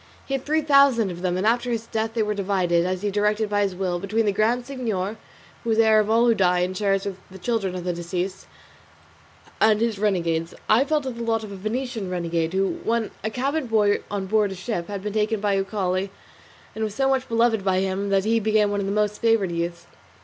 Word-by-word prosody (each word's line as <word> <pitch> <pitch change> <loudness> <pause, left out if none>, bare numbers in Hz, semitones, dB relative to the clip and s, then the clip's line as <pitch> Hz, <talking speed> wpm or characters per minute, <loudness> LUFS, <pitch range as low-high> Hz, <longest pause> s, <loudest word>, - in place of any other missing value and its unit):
He 275 - -5
had 270 -1 -1
three 310 +1 +1
thousand 275 -8 +4
of 175 0 -8
them, 180 -1 0
and 190 - -1
after 240 +2 +2
his 230 -1 -2
death 225 0 -3
they 225 - +2
were 210 0 -1
divided, 185 -4 +1
as 185 +1 -3
he 205 - 0
directed 210 +1 +1
by 205 0 +2
his 195 -2 0
will, 180 -2 -1
between 215 +4 0
the 205 - +3
Grand 230 +5 +1
Signor 225 -6 -3 0.5
(who 235 - -3
is 220 - +2
heir 220 -1 +5
of 215 0 0
all 230 +2 +4
who 235 - +5
die 180 -4 +2
and 185 +1 -1
shares 195 0 0
with 195 -2 -4
the 190 - -11
children 195 -2 -1
of 180 - -5
the 180 0 -1
deceased) 180 +2 -4 1.1
and 215 -1 +4
his 225 -3 0
renegades. 170 -5 0
I 230 +6 +4
fell 305 0 +1
to 265 -2 -4
the 235 -1 -8
lot 225 -1 0
of 210 - -8
a - - -6
Venetian 220 0 -3
renegade 170 -2 -1
who, 195 0 0
when 230 -1 0
a 220 - 0
cabin 270 +5 -2
boy 210 -2 +3
on 200 -2 -3
board 210 0 +1
a - - -5
ship, 185 -2 -4
had 200 -2 -5
been 210 -1 -3
taken 215 0 0
by 200 -1 +1
Uchali 195 -1 -1 0.6
and 220 - -3
was 210 -2 -3
so 270 +2 +1
much 265 -1 0
beloved 230 -2 +2
by 190 -1 +1
him 195 +1 -2
that 195 0 +2
he 225 +1 +3
became 215 -1 +2
one 205 - -1
of 195 - -2
his 200 - -1
most 210 0 0
favoured 225 -5 +2
youths. 170 0 -3
210 Hz, 235 wpm, -24 LUFS, 190-225 Hz, 1.1 s, heir